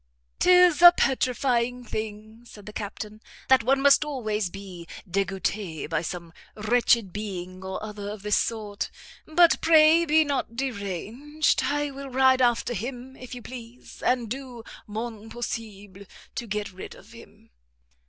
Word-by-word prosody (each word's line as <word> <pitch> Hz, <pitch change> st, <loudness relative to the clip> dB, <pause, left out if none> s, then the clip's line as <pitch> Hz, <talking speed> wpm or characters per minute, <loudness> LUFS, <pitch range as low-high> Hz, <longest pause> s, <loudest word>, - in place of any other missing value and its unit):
"'Tis 360 Hz, -3 st, +5 dB
a 350 Hz, 0 st, +12 dB
petrifying 250 Hz, -4 st, 0 dB
thing," 215 Hz, 0 st, -6 dB
said 210 Hz, -4 st, -14 dB
the 210 Hz, -, -9 dB
captain, 210 Hz, +1 st, -6 dB, 0.3 s
"that 260 Hz, -3 st, +5 dB
one 270 Hz, +3 st, +3 dB
must 280 Hz, +2 st, +5 dB
always 220 Hz, -9 st, -2 dB
be 185 Hz, -3 st, -10 dB, 0.2 s
degouté 190 Hz, -2 st, -2 dB
by -, -, -1 dB
some 170 Hz, 0 st, -6 dB, 0.2 s
wretched 220 Hz, -2 st, +2 dB
being 185 Hz, -3 st, -6 dB
or 190 Hz, +2 st, -5 dB
other 210 Hz, -1 st, -6 dB
of 205 Hz, -1 st, -8 dB
this 210 Hz, -1 st, +2 dB
sort; 210 Hz, -3 st, -2 dB, 0.4 s
but 335 Hz, +1 st, +4 dB
pray 320 Hz, +1 st, +6 dB
be 315 Hz, -1 st, +4 dB
not 280 Hz, -5 st, -2 dB
deranged, 250 Hz, -, -1 dB
I 290 Hz, 0 st, -1 dB
will 275 Hz, 0 st, -8 dB
ride 260 Hz, 0 st, +4 dB
after 240 Hz, 0 st, +2 dB
him, 245 Hz, +4 st, -6 dB
if 255 Hz, -1 st, -9 dB
you 245 Hz, -, -9 dB
please, 245 Hz, -1 st, -11 dB
and 245 Hz, -2 st, +1 dB
do 250 Hz, -1 st, -7 dB, 0.2 s
mon 220 Hz, 0 st, -6 dB
possible 205 Hz, -4 st, -7 dB, 0.3 s
to 235 Hz, -, -5 dB
get 210 Hz, -1 st, -3 dB
rid 185 Hz, -, -9 dB
of -, -, -17 dB
him." -, -, -16 dB
230 Hz, 145 wpm, -26 LUFS, 205-265 Hz, 0.4 s, a